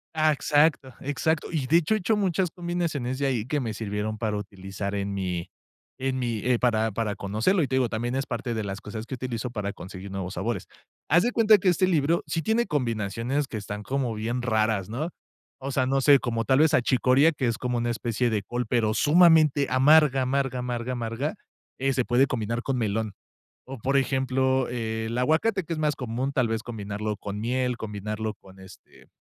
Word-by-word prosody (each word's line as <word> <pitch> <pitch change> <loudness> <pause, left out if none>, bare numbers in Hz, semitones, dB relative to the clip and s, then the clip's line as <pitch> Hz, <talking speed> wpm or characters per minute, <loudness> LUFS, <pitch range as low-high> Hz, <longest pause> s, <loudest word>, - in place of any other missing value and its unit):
Ah, 155 0 +4
exacto, 145 -2 +2
exacto. 155 +3 -1
Y, 155 -6 -1
de 160 +6 +4
hecho, 170 +5 +2
he - - +2
hecho 215 +2 +1
muchas 190 -3 0
combinaciones 170 -8 -2
de 140 - -1
ahí 125 -4 -1
que 150 +2 0
me 115 -5 -3
sirvieron 105 0 -3
para 105 -2 -1
utilizar 100 0 -6
en 100 0 -2
mi 90 -3 -3 0.5
en 130 0 -2
mi, 120 -3 -1
eh, 125 -2 +2
para 110 -2 +2
para 105 0 -2
conocerlo 110 - +1
y, 135 - 0
te 130 - -1
digo, 125 -3 +2
también 120 +2 -2
es 135 +1 -1
parte 120 -1 -3
de 110 - -2
las 100 -1 -4
cosas 110 +2 -7
que 130 - -4
utilizo 125 -1 -4
para 105 -4 -4
conseguir 95 +2 -9
nuevos 95 0 -4
sabores. 115 -5 -3 0.4
Haz 175 +4 +5
de 245 - +1
cuenta 220 -2 +6
que 185 -1 +2
este 180 +1 +3
libro 165 -1 +2
sí 165 -1 -2
tiene 230 +2 +1
combinaciones 120 - -1
que 115 - -5
están 105 0 -6
como 130 +1 -2
bien 115 +3 -3
raras, 110 -4 +1
¿no? 140 +9 -3 0.5
O 135 +1 -4
sea, 130 -1 +1
no 135 +1 +2
sé, 140 0 +6
como 115 -3 -2
tal 130 0 +3
vez 155 0 +4
achicoria, 130 +4 +4
que 135 -4 -2
es 115 -1 0
como 125 -1 -2
una 120 0 -1
especie 120 +1 -1
de 105 -3 -1
col, 120 +4 -3
pero 110 -2 +1
sumamente 155 0 +5
amarga, 135 +1 +5
amarga, 135 0 0
amarga, 125 0 -3
amarga, 120 - -3 0.4
eh, 135 +1 +1
se 125 -2 0
puede 125 +3 +3
combinar 115 -1 -2
con 135 +1 -2
melón 110 -2 -1 0.5
o, 135 0 -8
por 135 +5 0
ejemplo, 130 -1 +1
el 110 -1 -3
aguacate, 160 - +2
que 165 - -5
es 160 - -2
más 150 -1 +1
común, 125 +2 -3
tal 130 -4 +1
vez 115 0 -2
combinarlo 105 -2 -4
con 100 0 -6
miel, 125 +2 0
combinarlo 105 0 -4
con, 95 -1 -18
este, 95 -1 -16
125 Hz, 205 wpm, -26 LUFS, 110-140 Hz, 0.5 s, cuenta